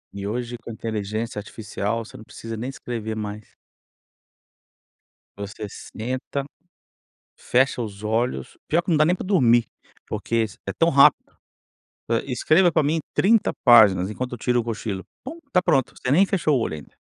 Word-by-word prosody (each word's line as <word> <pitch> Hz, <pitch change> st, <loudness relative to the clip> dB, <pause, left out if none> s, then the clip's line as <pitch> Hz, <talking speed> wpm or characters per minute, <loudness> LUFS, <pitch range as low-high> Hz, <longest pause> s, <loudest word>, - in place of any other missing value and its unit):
E 100 Hz, 0 st, -4 dB
hoje 120 Hz, +2 st, -4 dB
com 115 Hz, -, -11 dB
a -, -, -5 dB
inteligência 110 Hz, 0 st, -4 dB
artificial, 110 Hz, +1 st, -4 dB
você -, -, -14 dB
não -, -, -10 dB
precisa 115 Hz, +1 st, -8 dB
nem 120 Hz, +4 st, -4 dB
escrever 115 Hz, -5 st, -5 dB
mais. 105 Hz, 0 st, -7 dB, 1.8 s
Você 100 Hz, +2 st, -6 dB
senta, 130 Hz, +7 st, -5 dB, 0.9 s
fecha 130 Hz, 0 st, +1 dB
os 105 Hz, -2 st, -7 dB
olhos 110 Hz, -, -1 dB
pior 165 Hz, +3 st, +2 dB
que 175 Hz, -, -7 dB
não 165 Hz, -, +3 dB
dá 155 Hz, -, +5 dB
nem 175 Hz, +3 st, +3 dB
para -, -, -7 dB
dormir, 120 Hz, -, +4 dB, 0.4 s
porque 115 Hz, -, -2 dB
s 110 Hz, -, -6 dB
é 100 Hz, -, -2 dB
tão 165 Hz, -, +3 dB
rápido. 140 Hz, -3 st, +4 dB, 0.8 s
Hã, 115 Hz, -, +2 dB
"escreva 155 Hz, +7 st, +3 dB
para 155 Hz, -1 st, +2 dB
mim 160 Hz, +3 st, +1 dB
30 220 Hz, +2 st, +3 dB
páginas, 105 Hz, -7 st, +7 dB
enquanto 125 Hz, +4 st, -4 dB
eu -, -, -4 dB
tiro 125 Hz, +1 st, +1 dB
um -, -, -1 dB
cochilo", 110 Hz, -4 st, -4 dB, 0.2 s
pum, 320 Hz, +6 st, -7 dB
está 225 Hz, -10 st, +2 dB
pronto, 145 Hz, -8 st, +2 dB
você 125 Hz, -, -2 dB
nem 180 Hz, +8 st, +5 dB
fechou 160 Hz, -7 st, +1 dB
o -, -, 0 dB
olho 95 Hz, -, -2 dB
ainda. 75 Hz, -, -12 dB
115 Hz, 170 wpm, -23 LUFS, 110-140 Hz, 1.8 s, páginas